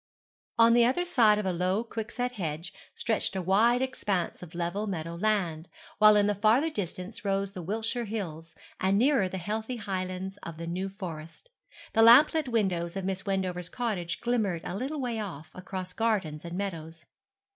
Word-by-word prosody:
On 230 0 +6
the 240 0 +6
other 265 +9 +2
side 220 -10 +4
of 210 - -2
a 185 - 0
low 185 +5 0
quickset 235 +2 -3
hedge 170 -6 -5 0.2
stretched 220 -3 -1
a 190 - -1
wide 230 +7 +4
expanse 205 -8 -2
of 175 -1 -10
level 175 +5 -2
meadow 165 -4 -4
land, 175 -4 -1 0.3
while 215 0 +8
in 205 -1 +4
the 205 - +2
farther 225 - +3
distance 195 - -5
rose 195 -1 0
the 185 - -6
Wiltshire 225 +6 -2
hills, 165 -7 -5 0.2
and 190 +1 +2
nearer 240 -5 +3
the 190 - -4
heathy 220 +6 -3
highlands 190 -2 -4
of 165 -1 -8
the 170 - -5
New 185 +3 -3
Forest. 175 - -8 0.4
The 225 - +4
lamp 240 +7 +8
lit 315 -4 0
windows 190 -7 0
of 195 -1 -3
Miss 195 +1 -3
Wendover's 185 -2 -1
cottage 185 -9 -3
glimmered 215 -8 0
a - - -4
little 270 +8 -3
way 240 -4 -2
off, 160 -7 -6
across 185 0 -6
gardens 195 -10 -1
and 170 +1 -5
meadows. 165 -5 -5
195 Hz, 180 wpm, -29 LUFS, 175-225 Hz, 0.4 s, while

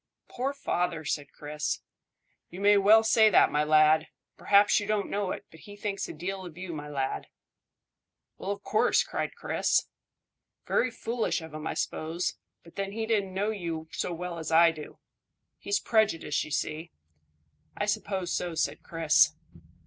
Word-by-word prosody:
"Poor 260 +3 -2
father!" 175 - -2
said 145 -1 -3
Chris. 150 0 -4 0.7
"You 180 - -9
may 205 +1 +5
well 210 +3 +6
say 220 0 +5
that, - - +5
my 150 0 +2
lad. 155 +1 +4 0.3
P'r'aps 205 +1 +4
you 205 - -5
don't 210 -1 -1
know 200 -2 -1
it, - - -5
but 160 - -15
he 205 +4 -12
thinks 205 -1 -4
a - - -6
deal 190 +4 -5
of 175 -2 -10
you, 180 -1 -6
my 150 -1 -6
lad." 135 - -3 1.1
"Why, 190 - -6
of 200 0 -3
course," 215 - +3
cried - - -4
Chris. 470 - +1 0.8
"Very 255 - +2
foolish 230 -2 -2
of 160 -2 -10
him, 155 0 -5
I - - -3
suppose, 165 +3 -2 0.3
but 170 - -17
then 195 0 -3
he 225 +1 -2
don't 205 -4 0
know 200 +3 -1
you 165 -6 -5
so - - -3
well 170 0 -5
as 160 0 -5
I 165 +1 +6
do. 155 -2 -10 0.6
He's 200 0 0
prejudiced, 205 -11 +1
you - - -9
see." 155 +2 -3 0.9
"I 205 - 0
suppose 195 -3 -2
so," 175 -2 -2
said - - -1
Chris. 155 -2 +3
180 Hz, 170 wpm, -28 LUFS, 160-205 Hz, 1.1 s, well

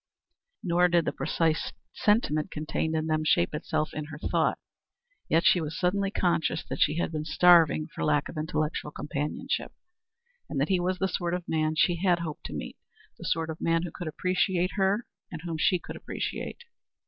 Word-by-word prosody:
Nor 180 0 +4
did 170 -2 +2
the - - 0
precise 160 +1 0 0.2
sentiment 205 -8 +2
contained 155 +1 -2
in 155 0 0
them 155 -1 +1
shape 85 - +2
itself 150 0 -2
in 155 0 -4
her 150 -1 -8
thought. - - +1 0.7
Yet 165 +2 +3
she 175 - +5
was 155 +1 -4
suddenly 195 +2 +1
conscious 175 -4 0
that - - -4
she 155 - +3
had 170 - 0
been 155 -1 -3
starving 165 0 +5
for - - -6
lack 150 -1 +2
of - - -9
intellectual 155 -1 -2
companionship, 150 0 -3 0.8
and 140 - -2
that 140 - +1
he 190 -2 +3
was 180 +1 0
the 190 - +1
sort 175 -2 -1
of 180 -1 -6
man 155 0 0
she 170 +2 +3
had 175 0 +3
hoped 165 -3 -6
to - - -8
meet - - -6 0.4
the - - -8
sort 160 0 0
of 160 - -9
man 165 0 +2
who 175 - -4
could 175 - -6
appreciate 180 +2 0
her 200 +3 +1 0.3
and 165 -2 -7
whom 165 -2 -4
she 180 - +4
could 175 - -9
appreciate. 485 - -5
165 Hz, 190 wpm, -28 LUFS, 155-180 Hz, 0.8 s, she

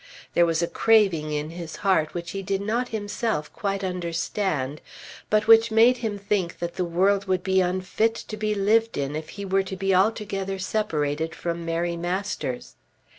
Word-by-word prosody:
There 170 0 +4
was 165 0 +1
a - - +1
craving 190 -10 +3
in 150 +1 -2
his 170 -1 -7
heart 180 -5 +2
which 170 -1 -4
he 195 - -4
did 195 0 -1
not 225 +5 -1
himself 210 -6 -3
quite 195 -1 -2
understand, 170 -4 -2 0.5
but 215 0 +3
which 225 +1 +7
made 230 +3 +5
him 220 -4 -3
think 200 -3 -1
that 170 0 -4
the 185 - -1
world 190 +4 +2
would 185 -2 0
be 190 0 +3
unfit 185 +5 0
to 220 - -7
be 215 0 -1
lived 220 +3 +2
in 140 +1 -2
if 155 0 -5
he 200 0 -7
were 195 0 +2
to 190 0 -6
be 195 +1 0
altogether 195 -1 0
separated 160 -6 -1
from 170 -1 -4
Mary 170 +1 -1
Masters. 175 -7 -3
190 Hz, 180 wpm, -25 LUFS, 170-210 Hz, 0.5 s, which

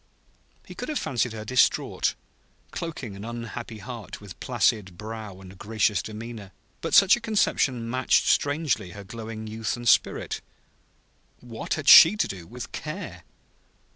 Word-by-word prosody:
He - - -10
could - - -6
have 305 - -1
fancied 120 -2 -1
her 110 -1 -7
distraught, 125 +3 +2 0.6
cloaking 140 -11 -6
an 100 - -9
unhappy 115 -1 -6
heart 110 +2 -8
with 100 -3 -12
placid 105 -6 0
brow 110 -2 -7
and 95 0 -13
gracious 105 -3 +1
demeanor; 110 -2 -8 0.3
but - - 0
such 195 0 +7
a - - -6
conception 145 - +1
matched 130 +2 +2
strangely 145 - +1
her 100 - -9
glowing 110 +1 -7
youth 110 0 -3
and 120 0 -6
spirit. - - +2 1.0
What 115 -2 -4
had 155 -2 -6
she 165 +6 +10
to - - +1
do 90 -4 -8
with 125 +1 -8
Care? 150 - -6
115 Hz, 145 wpm, -26 LUFS, 105-130 Hz, 1.0 s, she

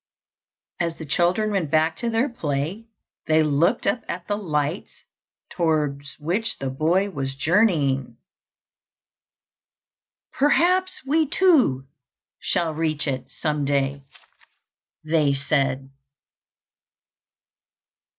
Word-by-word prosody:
As 170 -1 -1
the 160 - -7
children 175 +9 +1
went 185 -7 -1
back 160 +2 +2
to 235 - -2
their 230 +4 +1
play, 170 - -3 0.4
they 155 0 +4
looked 155 +9 +1
up 235 - +1
at 175 0 -5
the 205 - 0
light 155 -3 -2 0.6
towards 150 -4 -1
which 195 +9 -1
the 135 -1 -3
boy 175 +8 +1
was 135 -5 -4
journeying. 140 - +1 2.2
"Perhaps 360 +6 +2
we 310 +3 +2
too 275 - +3 0.5
shall 170 -4 0
reach 155 -1 -1
it 130 -3 -3
some 150 -2 -2
day," 140 0 0 1.0
they 155 -3 +2
said. 135 -1 -1
160 Hz, 100 wpm, -23 LUFS, 140-205 Hz, 2.2 s, they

